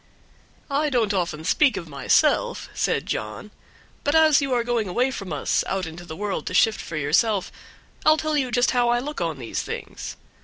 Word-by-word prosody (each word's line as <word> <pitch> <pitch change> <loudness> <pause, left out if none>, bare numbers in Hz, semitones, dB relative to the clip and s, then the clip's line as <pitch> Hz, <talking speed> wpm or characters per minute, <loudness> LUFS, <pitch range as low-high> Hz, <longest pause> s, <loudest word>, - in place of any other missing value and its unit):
"I 295 +2 +1
don't 230 -6 +1
often 170 -5 -2
speak 260 - +3
of 170 - -6
myself," 140 -3 +1
said - - 0
John, 105 - -5 0.5
"but 290 +2 +1
as 315 -2 +6
you 275 -1 -2
are 245 -2 +2
going 235 -3 0
away 245 +9 +1
from 195 -8 -6
us 150 - 0
out 190 -1 -1
into 165 +2 -9
the 160 -2 -7
world 205 +2 -3
to 185 - -3
shift 220 +3 +3
for 165 - -6
yourself 180 +8 +1 0.5
I'll 310 0 +5
just - - -4
tell 310 -1 0
you 265 -4 0 0.2
how 245 -1 +2
I 240 - +3
look 285 +1 -4
on 165 -3 -1
these 120 -4 -4
things. - - -7
210 Hz, 195 wpm, -24 LUFS, 170-265 Hz, 0.5 s, as